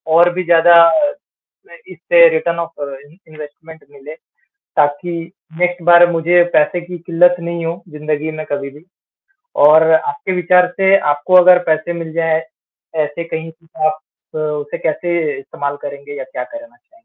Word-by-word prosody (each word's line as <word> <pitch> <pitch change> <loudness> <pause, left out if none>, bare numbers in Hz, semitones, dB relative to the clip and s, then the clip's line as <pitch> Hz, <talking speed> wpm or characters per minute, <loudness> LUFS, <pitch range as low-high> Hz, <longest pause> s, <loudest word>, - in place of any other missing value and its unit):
और 175 +1 +5
भी 185 - -2
ज़्यादा 170 0 +5 0.9
मैं - - -15 0.2
इससे - - +4
रिटर्न 170 - -2
ऑफ 165 -1 -4
और 140 -1 -6
इन 145 +4 -21
इन्वेस्टमेंट 155 +1 -13
मिले 145 +1 -12 0.6
ताकि 145 +4 0 0.5
नेक्स्ट 180 -1 -1
बार 175 0 +6
मुझे 170 +1 +3
पैसे 155 +3 +1
की 175 +1 -9
किल्लत 175 +1 +2
नहीं 170 0 -5
हो 170 +2 -5
ज़िंदगी 150 0 -4
में 155 - -6
कभी 140 -1 -3
भी। 145 +3 -17 0.8
और 160 +2 +5
आपके 430 - -1
विचार 180 +1 +3
से 195 0 +5
आपको 145 +5 -1
अगर 180 0 +6
पैसे 155 +2 0
मिल 165 -2 -7
जाए, 165 -1 +1 0.6
ऐसे 155 +2 -3
कहीं 165 0 -6
से 160 -1 -6
आप 155 0 -1 0.4
उसे 150 -1 -4
कैसे 160 -2 -2
इस्तेमाल 140 +1 -6
करेंगे 140 0 -8
या 135 - -6
क्या 130 -1 -7
करना 290 - -12
चाहेंगे? 335 +7 -30
165 Hz, 160 wpm, -16 LUFS, 150-175 Hz, 0.9 s, बार